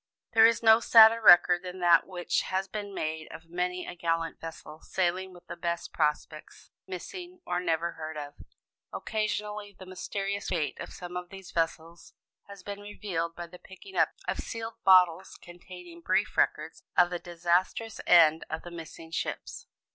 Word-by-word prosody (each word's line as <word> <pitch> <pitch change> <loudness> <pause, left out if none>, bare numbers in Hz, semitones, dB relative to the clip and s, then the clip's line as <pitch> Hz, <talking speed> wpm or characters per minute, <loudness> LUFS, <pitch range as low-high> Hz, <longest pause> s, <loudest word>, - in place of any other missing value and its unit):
There 225 0 +8
is 230 0 0
no 220 0 +7
sadder 230 0 +7
record 175 -3 +7
than 185 0 -8
that 175 -1 +5
which 180 -2 -1
has 190 +1 -2
been 205 0 -6
made 160 -4 -4
of 165 0 -11
many 180 +1 -2
a - - -7
gallant 165 -1 -2
vessel, 160 -1 -9
sailing 185 +1 -1
with 175 -1 -16
the - - -7
best 170 0 -4
prospects 155 0 -3 0.2
"Missing," 355 - -8
or 175 0 -1
"Never 170 -1 -1
heard 155 -1 -7
of." 145 -1 -7 0.6
Occasionally 210 -2 -3
the 190 - -11
mysterious 195 +2 -4
fate 165 -5 -2
of - - -6
some 180 0 -9
of 180 0 -5
these 195 -2 -11
vessels 165 0 -3 0.3
has 200 -2 -12
been 200 +1 -6
revealed 180 -5 -4
by 175 - -6
the 175 +1 -14
picking 385 - -14
up - - +3 0.2
of - - -2
sealed 225 -1 -7
bottles 185 -1 +4
containing 175 -1 -12
brief 210 +4 0
records - - 0 0.2
of 175 0 +5
the 175 - -3
disastrous 175 +6 -1
end 160 -2 +6
of 160 - -5
the 175 - -9
missing 165 -1 -10
ships. - - -5
180 Hz, 170 wpm, -28 LUFS, 170-200 Hz, 0.6 s, There